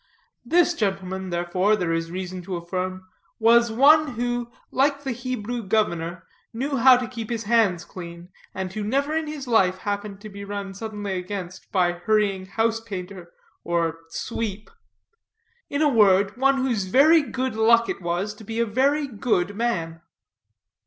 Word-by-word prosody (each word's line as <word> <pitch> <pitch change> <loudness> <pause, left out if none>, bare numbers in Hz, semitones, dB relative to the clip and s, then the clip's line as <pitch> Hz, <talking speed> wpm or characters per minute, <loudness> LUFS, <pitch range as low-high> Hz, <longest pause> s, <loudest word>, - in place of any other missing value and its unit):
This 345 +7 +3
gentleman, 190 - -2
therefore, 180 +4 +1
there 175 -5 -1
is 165 0 -2
reason 185 +1 -5
to 190 -1 -4
affirm, 185 +2 -4 0.3
was 235 +1 +4
one 285 +4 +5
who, 240 0 -2 0.2
like 280 +1 +1
the 270 - -2
Hebrew 245 -1 -4
governor, 180 -5 -1 0.3
knew 270 +4 -2
how 255 +1 +7
to 250 -1 -3
keep 230 -3 -7
his 230 -2 -2
hands 200 -6 +2
clean, 170 -1 -10 0.2
and 190 -1 -5
who 215 - -3
never 280 +8 0
in 320 -1 -1
his 295 -3 -6
life 185 -6 +3
happened 205 0 -4
to 215 - -9
be 200 0 -9
run 200 -1 -5
suddenly 205 -1 -5
against 185 -1 -7
by 180 -3 +3
hurrying 195 +1 0
house 225 +2 0
painter, 185 -5 -8 0.3
or 165 -1 -1
sweep; 215 +2 -5 1.0
in 285 +2 0
a - - +5
word, 200 -5 +4
one 270 +2 +3
whose 245 -7 0
very 295 - +5
good 260 -3 -3
luck 230 +1 +4
it - - -4
was 175 +4 -2
to 210 - -14
be 225 +2 -4
a 235 - +3
very 275 +7 +1
good 205 -5 -1
man. 165 -8 -2
210 Hz, 160 wpm, -24 LUFS, 185-240 Hz, 1.0 s, how